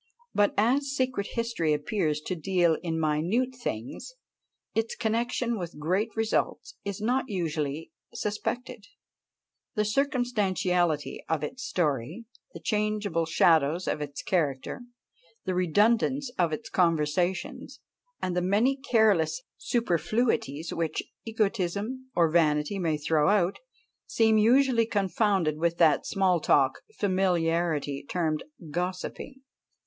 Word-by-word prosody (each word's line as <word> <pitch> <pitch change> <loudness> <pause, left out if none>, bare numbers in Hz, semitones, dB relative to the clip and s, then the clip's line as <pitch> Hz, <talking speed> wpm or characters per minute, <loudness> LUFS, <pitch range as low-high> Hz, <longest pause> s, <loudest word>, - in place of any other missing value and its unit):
But 205 0 +2
as 260 +7 +2
secret 255 -6 -1
history 230 -10 0
appears 150 0 -1
to 185 - -3
deal 175 -1 +2
in 165 -2 -2
minute 170 +12 +1
things, 240 - -6 0.6
its 225 +1 -1
connexion 235 0 -1
with 175 -3 -6
great 185 +9 0
results 225 0 -1
is 200 -1 -4
not 250 +5 +1
usually 160 -5 -3 0.2
suspected. 225 +2 -4 0.9
The 210 -1 +1
circumstantiality 205 - 0
of 160 -2 0
its 250 - -5
story, 155 - -1 0.3
the - - -9
changeable 210 -6 -1
shadows 160 +1 +3
of - - -1
its 145 -1 -5
characters, 145 - -1 0.6
the 185 - -1
redundance 225 - +2
of 175 -8 0
its 155 - -4
conversations, 175 +1 0 0.4
and 180 -1 -1
the 180 - +1
many 215 +9 +2
careless 205 - +2
superfluities 175 - 0
which 165 -1 -2 0.2
egotism 220 +3 -2
or 165 -2 +3
vanity 155 +2 +2
may 160 -4 0
throw 150 +1 +2
out, 195 -2 +2 0.5
seem 220 -1 +3
usually 235 +1 +4
confounded 195 -6 +1
with 170 +1 +1
that 155 -4 +4
small 190 -3 +2
talk 135 -3 +3 0.2
familiarly 170 -6 0
termed 160 -4 -1 0.3
gossiping. 180 - -4
185 Hz, 115 wpm, -28 LUFS, 160-225 Hz, 0.9 s, usually